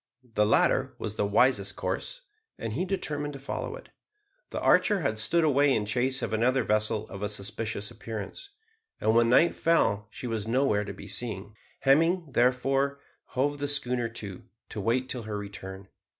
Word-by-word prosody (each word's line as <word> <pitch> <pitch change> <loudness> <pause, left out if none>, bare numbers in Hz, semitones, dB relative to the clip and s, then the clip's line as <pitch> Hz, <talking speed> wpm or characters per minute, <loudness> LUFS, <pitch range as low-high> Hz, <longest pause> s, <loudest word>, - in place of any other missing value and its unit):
The 105 -1 +3
latter 110 - +3
was 110 -1 -4
the 105 - 0
wisest 105 -2 +3
course, - - -3 0.4
and 115 -2 -4
he 170 +10 -1
determined 150 -6 -1
to 140 - -8
follow 135 - -4
it. - - -13 0.6
The - - -4
Archer 205 -6 +4
had 110 -7 -1
stood 165 +10 +3
away 145 -2 +4
in 105 - 0
chase 125 +4 0
of - - -2
another 125 +3 +2
vessel 110 0 +1
of 100 - -8
a 105 - -1
suspicious 105 +1 -2
appearance, 110 - -7 0.5
and 110 - +2
when 115 0 +4
night 160 +8 +5
fell 105 -11 +2
she 120 - -8
was 110 -3 -3
nowhere 115 -4 +2
to 100 - -6
be 100 - -10
seen. 105 -2 -2 0.3
Hemming, 165 +4 +3
therefore, 135 +3 +2 0.4
hove 145 +2 +1
the 145 - -1
schooner 125 -4 +1
to, 105 -5 -7 0.3
to 105 - -5
wait 125 +5 +1
till 125 -2 -4
her 110 -1 -4
return. 95 -1 -8
115 Hz, 175 wpm, -28 LUFS, 105-140 Hz, 0.6 s, night